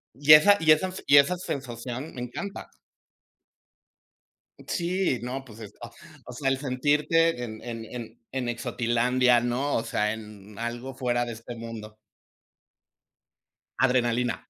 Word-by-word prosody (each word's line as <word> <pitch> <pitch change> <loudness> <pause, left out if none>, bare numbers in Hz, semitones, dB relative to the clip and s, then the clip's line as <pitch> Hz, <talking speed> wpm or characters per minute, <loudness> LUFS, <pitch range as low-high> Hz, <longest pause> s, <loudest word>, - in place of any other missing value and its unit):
Y 145 +3 +3
esa 200 +7 +8
y 160 -1 +4
esa 185 +5 +3
y 145 - +6
esa 145 +6 +5
sensación 130 -3 -6
me 125 - -6
encanta. 160 - -6 2.0
Sí, 175 -6 -1
no, 130 +2 -5
pues, 110 -3 -14
es 105 -2 -10 0.5
o 125 - -9
sea 135 +2 -1
el 135 - +1
sentirte 145 +3 +1
en 110 -2 -7
en 115 -2 -6
en 120 0 -9
en 125 -2 -2
exotilandia 120 +1 +2
¿no? 120 +4 -1
O 115 - 0
sea 105 -1 -1
en 105 -2 -11
algo 120 +3 -5
fuera 120 -2 0
de 120 - -5
este 115 +2 -9
mundo. 115 -2 -9 1.8
Adrenalina. 125 -2 +2
125 Hz, 130 wpm, -26 LUFS, 115-140 Hz, 2.0 s, esa